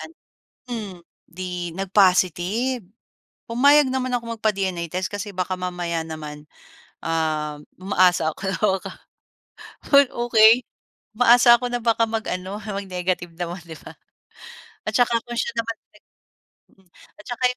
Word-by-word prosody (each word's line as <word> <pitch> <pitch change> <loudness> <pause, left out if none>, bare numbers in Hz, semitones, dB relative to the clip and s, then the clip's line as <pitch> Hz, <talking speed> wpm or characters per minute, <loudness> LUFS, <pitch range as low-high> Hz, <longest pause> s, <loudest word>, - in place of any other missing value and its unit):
ano, 325 - -10 0.6
hmm, 215 -5 -5 0.3
di 180 -1 -5
nagpositive. 195 +4 +2 0.6
Pumayag 280 +4 +5
naman 255 -1 -2
akong 230 -2 -3
magpa-DNA 190 -5 -1
test 185 +1 -2
kasi 205 0 -5
baka 185 0 -2
mamaya 175 -2 -3
naman, 150 -2 -8 0.6
uhm, 155 -2 -2 0.2
umaasa 180 -4 +3
ako - - -16
na 190 - -1
baka 195 -3 0 1.0
'wag 280 -2 +7
okey. 235 0 +5 0.6
Umaasa 240 0 +7
ako 250 - -2
na 245 - 0
baka 230 -1 +3
mag-ano 200 -3 -4
mag-negative 185 -4 -3
naman, 175 +1 -4
'di 160 -2 -10
ba? - - -12 0.9
At - - -1
saka 240 -1 +3
kung 240 0 -6
siya 235 - -2
naman 230 0 -2
talaga, - - -26 0.8
mm - - -32 0.3
at - - -14
saka 245 +1 -5
195 Hz, 130 wpm, -23 LUFS, 180-235 Hz, 1.0 s, wag